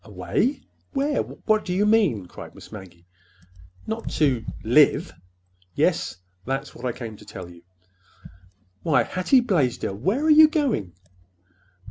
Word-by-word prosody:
"Away? 265 +4 -1 0.3
Where? 285 +1 +1
What 215 -1 -1
do 180 - -3
you 200 +3 +2
mean?" 200 - +2
cried - - -11
Miss - - -13
Maggie. 95 -5 -12 0.8
"Not 220 +1 -4
to—live!" 135 -7 +2 0.6
"Yes. - - +1 0.3
That's 135 +5 -4
what 120 - -9
I - - 0
came 115 -3 -8
to - - -15
tell 90 -2 -9
you." 85 -1 -15 1.2
"Why, 155 - +3
Hattie 185 +8 +2
Blaisdell, 150 - 0
where 195 - -1
are 315 - +4
you 310 +1 +9
going?" 280 - -1
165 Hz, 130 wpm, -24 LUFS, -, 1.2 s, you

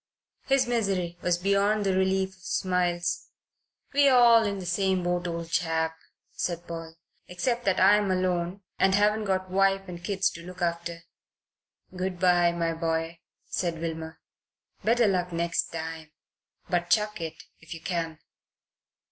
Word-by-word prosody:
His 270 -1 +3
misery 195 -7 -1
was 175 -1 +1
beyond 200 +3 +2
the 190 -1 +2
relief 190 0 +1
of 190 -1 -21
smiles. 175 -1 -1 0.7
"We're 280 -2 +5
all 235 -2 +7
in 200 -1 -1
the 185 - -6
same 185 +1 +1
boat, 175 0 -1
old 170 -1 -5
chap," 160 -1 0 0.4
said 175 -1 -3
Paul, 165 -1 -7 0.3
"except 235 +7 -2
that 190 -1 +2
I'm 205 +1 +5
alone 185 +1 -1 0.2
and 190 0 +4
haven't 210 +1 +2
got 185 -1 -1
wife 195 0 +2
and 175 -1 -8
kids 195 0 +1
to 170 - -10
look 180 +1 -10
after." 170 -1 -2 0.9
"Good 185 -1 -3
bye, 175 -1 +4
my 170 -1 -1
boy," 165 0 -2 0.3
said 170 -2 -2
Wilmer. 160 -1 -5 0.6
"Better 235 +2 +3
luck 180 -3 +1
next 170 0 0
time. 160 -1 -6 0.6
But 175 -1 0
chuck 210 -1 +1
it, 160 -1 -6 0.2
if 160 +1 -9
you - - -9
can." 165 -3 -3
180 Hz, 150 wpm, -27 LUFS, 170-195 Hz, 0.9 s, all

